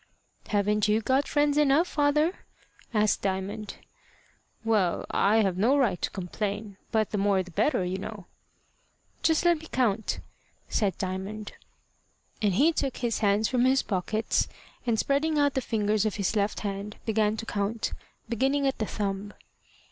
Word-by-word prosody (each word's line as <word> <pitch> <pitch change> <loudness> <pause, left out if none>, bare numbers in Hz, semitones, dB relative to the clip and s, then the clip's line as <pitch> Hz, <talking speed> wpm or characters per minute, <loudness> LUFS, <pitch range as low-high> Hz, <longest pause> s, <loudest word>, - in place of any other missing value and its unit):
"Haven't 210 0 +2
you 210 +1 +3
got 265 +5 +1
friends 290 0 +2
enough, 300 +4 +4
father?" 300 +4 +1 0.4
asked 215 -2 +2
Diamond. 200 +2 -3 0.9
"Well, 205 -6 +1
I 215 +2 +3
have 185 -2 0
no 250 +8 +4
right 225 -10 +1
to - - 0
complain; 200 +2 -4
but 220 -2 +1
the 210 - -1
more 195 -1 +2
the 180 - -13
better, 215 - +1
you 185 +2 -2
know." 200 -1 -7 1.0
"Just 320 +1 +2
let 345 -2 +4
me 320 - -11
count," 220 -4 0 0.5
said 200 -4 0
Diamond. 195 +2 -4 0.9
And 205 -4 +2
he 310 - +4
took 275 -4 -2
his 240 -3 -1
hands 210 0 +2
from 250 -1 +2
his 265 +1 +3
pockets, 215 +3 0 0.4
and 230 -2 +2
spreading 295 +6 +1
out 285 -1 +3
the 265 - 0
fingers 215 -3 +1
of 215 -2 -1
his 200 +1 -1
left 205 0 0
hand, 200 0 -4
began 220 -1 +1
to 225 - -5
count, 210 +1 -2 0.3
beginning 270 +5 +1
at 270 - 0
the 215 - -1
thumb. 200 0 -3
215 Hz, 155 wpm, -27 LUFS, 200-265 Hz, 1.0 s, enough